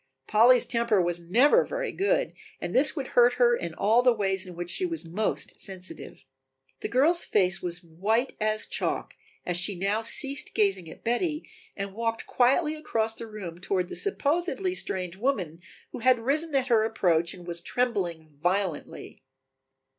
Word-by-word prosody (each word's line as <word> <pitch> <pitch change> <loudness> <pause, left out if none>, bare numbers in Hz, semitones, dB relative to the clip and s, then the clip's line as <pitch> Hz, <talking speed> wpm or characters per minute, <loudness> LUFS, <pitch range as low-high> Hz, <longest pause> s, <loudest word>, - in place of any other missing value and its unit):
Polly's 235 +3 +5
temper 235 -4 +1
was 175 -1 0
never 245 - +4
very - - -4
good, 410 +6 0 0.3
and - - -5
this 285 +5 +3
would 275 -4 -4
hurt 245 0 +5
her 240 -1 +3
in 170 -7 -5
all 225 +4 +3
the 250 0 +5
ways 195 -4 -1
in 180 - -10
which 175 0 -4
she 380 - 0
was 335 - -3
most 200 +6 -3
sensitive. 190 -2 -9 0.6
The - - -3
girl's 315 +8 +3
face 190 -3 +2
was 175 0 -2
white 205 +10 -1
as 215 0 0
chalk - - -3 0.3
as 175 -1 -1
she 185 +3 +2
now 200 +4 0
ceased 275 +4 +2
gazing 195 -5 +1
at - - -13
Betty 300 +7 -1 0.3
and 195 -1 -5
walked 230 +1 -2
quietly 275 +6 +2
across 225 -8 -2
the 230 0 -6
room 185 -6 -8
toward 185 -1 -1
the - - -6
supposedly 360 +1 -1
strange 185 - -2
woman 190 - -2 0.3
who - - -7
had 255 +1 +4
risen 285 +6 0
at 265 -1 +2
her 225 -2 +4
approach 175 -7 +1
and 175 -1 -13
was 170 -1 -3
trembling 180 -9 -2
violently. 175 +2 -3
220 Hz, 170 wpm, -27 LUFS, 180-255 Hz, 0.6 s, Polly's